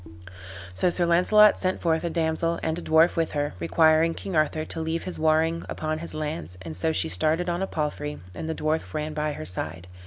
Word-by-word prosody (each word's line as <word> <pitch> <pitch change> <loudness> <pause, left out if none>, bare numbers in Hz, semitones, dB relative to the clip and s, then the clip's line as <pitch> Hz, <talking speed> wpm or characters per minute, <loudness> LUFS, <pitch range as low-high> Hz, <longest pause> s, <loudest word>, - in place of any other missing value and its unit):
So 135 - +2
Sir 175 0 +3
Launcelot 200 +5 +5
sent 185 0 0
forth 160 -1 0
a 170 - -1
damsel, 165 0 0
and 160 +1 -1
a - - -7
dwarf 160 +1 +4
with 165 -2 -1
her, 145 0 -1
requiring 160 - +3
King 190 - -5
Arthur 155 0 +1
to 160 - -5
leave 160 +1 -2
his 185 - -6
warring 160 +1 +2
upon 155 0 -3
his 165 -1 -4
lands; 90 - -5
and 80 -2 -6
so 95 - 0
she - - 0
started 155 - +1
on 175 +1 -1
a 195 - -1
palfrey, 150 -2 -3
and 160 - -6
the 160 - -2
dwarf 155 +1 -2
ran 155 0 -3
by 150 0 -2
her 80 - -7
side. 85 0 -4
160 Hz, 215 wpm, -25 LUFS, 150-165 Hz, -, Launcelot